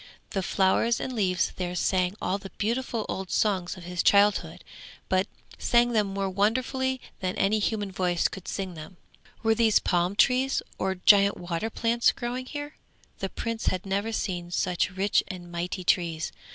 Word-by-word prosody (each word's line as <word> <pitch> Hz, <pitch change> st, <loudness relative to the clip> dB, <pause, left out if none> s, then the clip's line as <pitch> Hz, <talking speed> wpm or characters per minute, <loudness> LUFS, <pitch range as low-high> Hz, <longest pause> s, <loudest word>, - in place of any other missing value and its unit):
The 195 Hz, -, -1 dB
flowers 190 Hz, +5 st, +2 dB
and 260 Hz, -, -4 dB
leaves 190 Hz, -5 st, +1 dB
there 180 Hz, -1 st, -3 dB
sang 185 Hz, +1 st, +1 dB
all 190 Hz, +2 st, -1 dB
the 195 Hz, -, -9 dB
beautiful 230 Hz, 0 st, -1 dB
old 190 Hz, -1 st, -4 dB
songs 190 Hz, -4 st, 0 dB
of 180 Hz, -, -10 dB
his 180 Hz, 0 st, -2 dB
childhood, 205 Hz, 0 st, +3 dB, 0.5 s
but 190 Hz, +1 st, +2 dB, 0.3 s
sang 240 Hz, 0 st, +3 dB
them 215 Hz, -3 st, +2 dB
more 195 Hz, 0 st, -2 dB
wonderfully 255 Hz, +7 st, 0 dB, 0.2 s
than 185 Hz, -1 st, -2 dB
any 210 Hz, +2 st, +2 dB
human 205 Hz, -1 st, -1 dB
voice 180 Hz, -2 st, +1 dB
could 190 Hz, -, -10 dB
sing 190 Hz, -2 st, -4 dB
them. 165 Hz, +3 st, -10 dB, 0.5 s
Were 225 Hz, 0 st, +4 dB
these 220 Hz, -2 st, +4 dB
palm 175 Hz, +2 st, +1 dB
trees 260 Hz, +4 st, +3 dB, 0.2 s
or 190 Hz, 0 st, 0 dB
giant 200 Hz, +1 st, +5 dB
water 175 Hz, +4 st, -3 dB
plants 235 Hz, +1 st, +2 dB
growing 250 Hz, +2 st, -4 dB
here? 290 Hz, +1 st, -6 dB, 0.4 s
The 195 Hz, -, -2 dB
Prince 230 Hz, +2 st, -4 dB
had 185 Hz, 0 st, 0 dB
never 200 Hz, +3 st, -1 dB
seen 180 Hz, -5 st, -3 dB
such 180 Hz, +1 st, 0 dB
rich 195 Hz, +2 st, +1 dB
and 175 Hz, -3 st, -8 dB
mighty 175 Hz, +2 st, -3 dB
trees. 165 Hz, -3 st, +1 dB
195 Hz, 165 wpm, -27 LUFS, 180-225 Hz, 0.5 s, giant